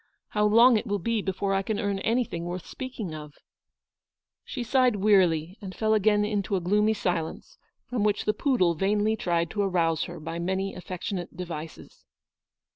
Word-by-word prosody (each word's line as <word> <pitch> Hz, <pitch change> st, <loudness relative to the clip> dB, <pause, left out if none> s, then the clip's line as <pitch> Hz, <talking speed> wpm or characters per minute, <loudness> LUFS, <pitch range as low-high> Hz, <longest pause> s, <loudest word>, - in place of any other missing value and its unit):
How 210 Hz, 0 st, +1 dB
long 230 Hz, +3 st, +6 dB
it 225 Hz, -, -4 dB
will 205 Hz, 0 st, 0 dB
be 220 Hz, +4 st, -1 dB
before 195 Hz, +1 st, -1 dB
I 195 Hz, -, +2 dB
can 205 Hz, +1 st, -2 dB
earn 200 Hz, -1 st, -1 dB
anything 225 Hz, -7 st, -1 dB
worth 175 Hz, 0 st, -5 dB
speaking 245 Hz, -10 st, -6 dB
of! 150 Hz, -1 st, -8 dB
n -, -, -26 dB, 1.0 s
She 250 Hz, -, -5 dB
sighed 250 Hz, -1 st, +3 dB
wearily, 185 Hz, -3 st, +2 dB
and 190 Hz, -2 st, -7 dB
fell 220 Hz, -1 st, +1 dB
again 210 Hz, 0 st, +3 dB
into 205 Hz, -1 st, -1 dB
a -, -, +1 dB
gloomy 210 Hz, +5 st, +2 dB
silence, 180 Hz, -5 st, -3 dB, 0.3 s
from 245 Hz, -4 st, -1 dB
which 210 Hz, -1 st, +1 dB
the 210 Hz, -, +2 dB
poodle 215 Hz, -, +2 dB
vainly 205 Hz, +5 st, +1 dB
tried 170 Hz, -5 st, -1 dB
to 205 Hz, -, -1 dB
arouse 170 Hz, -5 st, +1 dB
her 170 Hz, 0 st, -8 dB
by 165 Hz, +2 st, -5 dB
many 190 Hz, +3 st, -2 dB
affectionate 180 Hz, -1 st, -6 dB
devices. 165 Hz, -3 st, -8 dB
195 Hz, 175 wpm, -27 LUFS, 175-215 Hz, 1.0 s, long